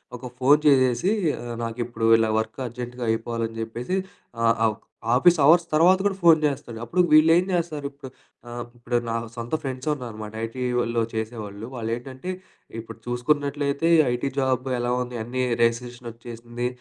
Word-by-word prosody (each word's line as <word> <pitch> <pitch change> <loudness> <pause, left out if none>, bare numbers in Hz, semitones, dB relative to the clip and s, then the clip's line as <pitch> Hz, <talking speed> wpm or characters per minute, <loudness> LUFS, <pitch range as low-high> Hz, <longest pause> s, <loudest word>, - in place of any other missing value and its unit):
ఒక 125 - -9
ఫోన్ 145 +4 +5
చేసేసి 130 +4 +4 0.3
"ఆహ్, 120 -1 -5
నాకిప్పుడు 115 0 -3
ఇలా 110 -1 +2
వర్క్ 110 +4 -5
అర్జెంట్‌గా 120 +1 -6
అయిపోవాలని" 115 0 -3
జెప్పేసి 120 +10 -3 0.5
ఆహ్, 115 0 +4 0.2
ఒక్ 115 - -19 0.3
ఆఫీసు 170 +5 +5
అవర్స్ 170 +4 +6
తర్వాత 175 +4 +6
కూడా 195 -1 +1
ఫోన్ 165 -2 +7
జేస్తాడు. 135 -5 -2
అప్పుడు 180 +10 +1
వీళ్లేం 165 +3 +6
జేస్తారిప్పుడు 145 -5 -3 0.4
ఆహ్, 120 0 -5
ఇప్పుడు 120 0 -1
నా 115 - -1 0.2
సొంత 120 +5 -3
ఫ్రెండ్సున్నారనమాట 125 -6 -4
ఐటీలో 120 -1 -1
చేసేవాళ్ళు. 110 -2 -5
వాళ్లేంటంటే 125 +7 -5 0.5
ఇప్పుడు 115 - -9
చూసుకున్నట్లయితే 140 +4 0
ఈ - - +5
ఐటీ 125 +3 -2
జాబ్ 130 -1 0
ఎలా 120 0 -1
ఉంది 125 -1 -5
అన్నీ 130 +2 -2 0.2
రిసిషనొచ్చేసింది. 120 0 -3
125 Hz, 135 wpm, -24 LUFS, 115-140 Hz, 0.5 s, ఫోన్